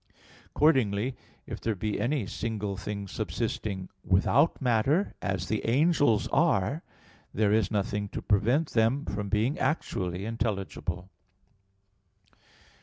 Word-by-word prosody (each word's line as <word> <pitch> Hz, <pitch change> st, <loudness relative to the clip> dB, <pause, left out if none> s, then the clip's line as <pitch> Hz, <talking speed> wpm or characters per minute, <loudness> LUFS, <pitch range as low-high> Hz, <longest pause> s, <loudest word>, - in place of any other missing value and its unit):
Accordingly, 125 Hz, -5 st, +2 dB, 0.3 s
if -, -, -7 dB
there 115 Hz, -2 st, -1 dB
be 105 Hz, +2 st, -2 dB
any 130 Hz, -2 st, 0 dB
single 105 Hz, 0 st, -3 dB
things 100 Hz, 0 st, -5 dB
subsisting 95 Hz, -3 st, -3 dB, 0.2 s
without 125 Hz, -, +3 dB
matter, 135 Hz, -, +2 dB
as 95 Hz, -2 st, -2 dB
the 110 Hz, -, -1 dB
angels 145 Hz, -3 st, +3 dB
are, 110 Hz, -, +2 dB, 0.5 s
there 105 Hz, 0 st, +3 dB
is 110 Hz, -3 st, +2 dB
nothing 100 Hz, -1 st, -1 dB
to -, -, -5 dB
prevent 120 Hz, +10 st, +2 dB
them 120 Hz, +6 st, +2 dB
from 105 Hz, -1 st, -3 dB
being 110 Hz, +8 st, +1 dB
actually 95 Hz, -, -1 dB
intelligible. 95 Hz, -5 st, -3 dB
110 Hz, 110 wpm, -28 LUFS, 100-125 Hz, 0.5 s, without